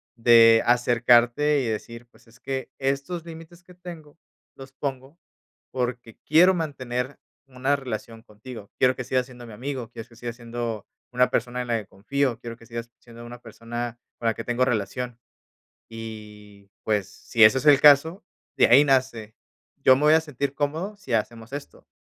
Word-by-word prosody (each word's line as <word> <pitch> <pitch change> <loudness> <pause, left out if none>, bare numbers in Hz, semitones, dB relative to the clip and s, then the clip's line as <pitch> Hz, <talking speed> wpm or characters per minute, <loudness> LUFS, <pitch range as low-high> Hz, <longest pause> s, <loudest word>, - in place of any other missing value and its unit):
de 115 -1 +6
acercarte 120 +4 +3
y 125 - -2
decir: 115 +2 -6 0.2
"Es 115 0 -21
que, 130 -2 -5
estos 140 +5 -2
límites 165 +1 -12
que 180 - -17
tengo 170 -4 -12 0.4
los 135 0 -12
pongo, 135 +2 -6 0.5
porque 125 -2 -4
quiero 175 +5 +5
mantener 130 -5 -4 0.3
una 135 +2 0
relación 115 -4 -7
contigo. 110 -1 -12
Quiero 130 0 +3
que 125 - -5
sigas 130 0 0
siendo 125 -1 -13
mi 115 - -11
amigo, 125 +1 -5
quiero 115 -2 -9
que 115 - -20
sigas 120 0 -6
siendo 115 -2 -5 0.3
una 125 0 +2
persona 125 +1 -2
en 125 - -6
la 115 - +1
que 105 - -11
confío, 125 +4 -2
quiero 115 -1 -8
que 115 - -17
sigas 115 0 -7
siendo 120 0 -13
una 120 0 -10
persona 120 +1 -6 0.2
con - - -8
la 115 - +2
que - - -7
tengo 120 +1 0
relación". 120 +1 -3 0.8
Y, 105 -3 -11
pues, 105 -3 0
si 115 - +1
ese 110 +5 +7
es 130 - -8
el 145 -2 +7
caso, 150 +6 +5 0.3
de - - +5
ahí 135 +5 +7
nace. 130 -6 0 0.5
Yo 130 - +7
me 140 - -2
voy 150 +1 +6
a 160 - +5
sentir 140 -3 -4
cómodo 160 +9 -3
si 135 -12 -7
hacemos 115 +2 -2
esto. 145 0 -9
125 Hz, 175 wpm, -24 LUFS, 115-140 Hz, 0.8 s, ese